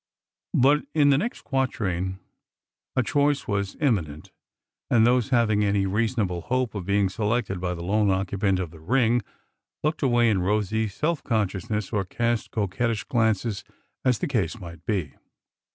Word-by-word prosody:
But 145 +4 +4
in 145 -2 +5
the 135 - +4
next 235 +7 -4
quatrain 100 -9 -1 0.8
a 130 - +3
choice 145 +2 +1
was 100 -1 -2
imminent, 90 - -1 0.6
and 115 -2 +5
those 125 +1 +3
having 110 -4 +3
any 100 -1 +2
reasonable 105 -3 0
hope 130 +3 -1
of 100 -4 -5
being 100 0 +3
selected 105 -1 -1
by 90 -1 -1
the 85 - -7
lone 105 +3 +2
occupant 95 0 +1
of 90 -4 -4
the 80 - -13
ring 120 +6 +2 0.6
looked 155 +1 0
away 120 -4 +3
in 95 -3 +1
rosy 105 +3 0
self 150 - -2
consciousness 105 -1 -1
or 100 -2 +1
cast 115 +4 -1
coquettish 110 +2 -1
glances, 110 -3 0 0.4
as 125 -3 +3
the - - -2
case 115 - -1
might 85 -3 -10
be. 95 -8 -1
110 Hz, 150 wpm, -25 LUFS, 95-125 Hz, 0.8 s, in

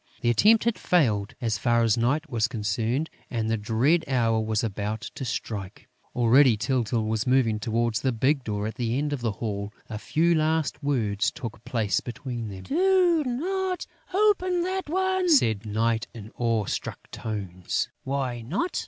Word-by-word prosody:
The 120 -1 +3
attempt 215 - +5
had 235 -1 0
failed, 110 - +1
as 110 -3 -1
far 120 +1 +2
as 115 -2 +3
Night 140 +8 0
was 115 -4 0
concerned, 115 +5 -1 0.2
and 110 -3 -1
the - - +3
dread 120 +10 +2
hour 115 -4 +2
was 110 0 0
about 105 0 -3
to - - -6
strike. 105 -5 -5 0.3
Already, 125 0 +5
Tyltyl 115 -2 0
was 110 +3 -1
moving 125 -4 +3
towards 115 +1 0
the 130 - +1
big 130 +4 +1
door 105 -2 -2
at 110 - -3
the 120 0 -1
end 145 +1 -1
of 140 - -3
the 115 -3 -1
hall. 100 -1 -4 0.2
A 105 - -4
few 170 +8 +2
last 155 -1 0
words 110 -8 +1
took 115 -2 -8
place 110 -4 0
between 120 -2 -6
them: 95 -2 -8
"Do 355 0 +3
not 365 +8 -2 0.3
open 370 -3 +2
that 375 -2 -3
one!" 375 +1 +1
said 110 - +3
Night, 115 +2 0
in 110 -1 -9
awe 115 -3 0
struck - - -5
tones. 95 -5 -3 0.2
"Why 130 -3 -2
not?" 180 - -2
120 Hz, 170 wpm, -26 LUFS, 110-155 Hz, 0.3 s, attempt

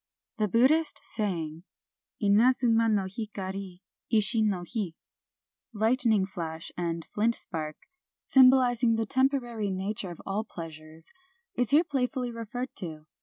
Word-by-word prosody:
The 210 - +2
Buddhist 290 - +3
saying, 165 -6 -3 0.6
Inadzuma 230 +2 +3
no 200 -3 +1
hikari, 190 -2 -6 0.3
ishi 220 +1 +3
no 200 -5 0
hi 205 -8 -3 0.8
(lightning 220 -2 +2
flash 165 -4 -6
and 170 -2 -3
flint 230 +3 +2
spark), 155 -3 -4 0.3
— - - -65
symbolizing 255 -3 +6
the 225 0 -1
tem 260 +4 +3
porary 240 -7 -3
nature 190 +1 -3
of 170 - -9
all 200 +3 -2
pleasures, 160 -4 -10 0.2
— 380 0 -46
is 245 -2 +1
here 300 +4 +5
playf 270 -5 -1
idly 250 -1 -2
referred 235 +3 -5
to. 155 -4 -5
215 Hz, 135 wpm, -28 LUFS, 185-245 Hz, 0.8 s, symbolizing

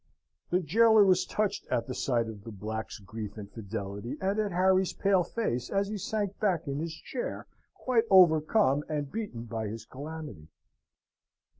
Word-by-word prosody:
The 180 - +2
jailor 220 +5 +5
was 185 -2 +3
touched 210 -1 -1
at 115 - 0
the 130 - -5
sight 120 -3 0
of 105 -3 -8
the 115 - -8
black's 110 +2 -5
grief 105 +1 -7
and 105 -2 -7
fidelity, 100 +3 -5
and 195 +3 0
at 210 -2 0
Harry's 185 +1 +3
pale 195 -2 +3
face 145 - -2
as 195 0 0
he 215 - -3
sank 205 0 -2
back 185 -7 +1
in 140 +1 -2
his 165 0 -4
chair 255 - -5 0.3
quite 235 -3 +1
overcome 160 -4 +5
and 145 -2 -2
beaten 205 - -4
by 115 -2 -4
his 110 +1 -6
calamity. 145 - -8
155 Hz, 165 wpm, -29 LUFS, -, 0.3 s, jailor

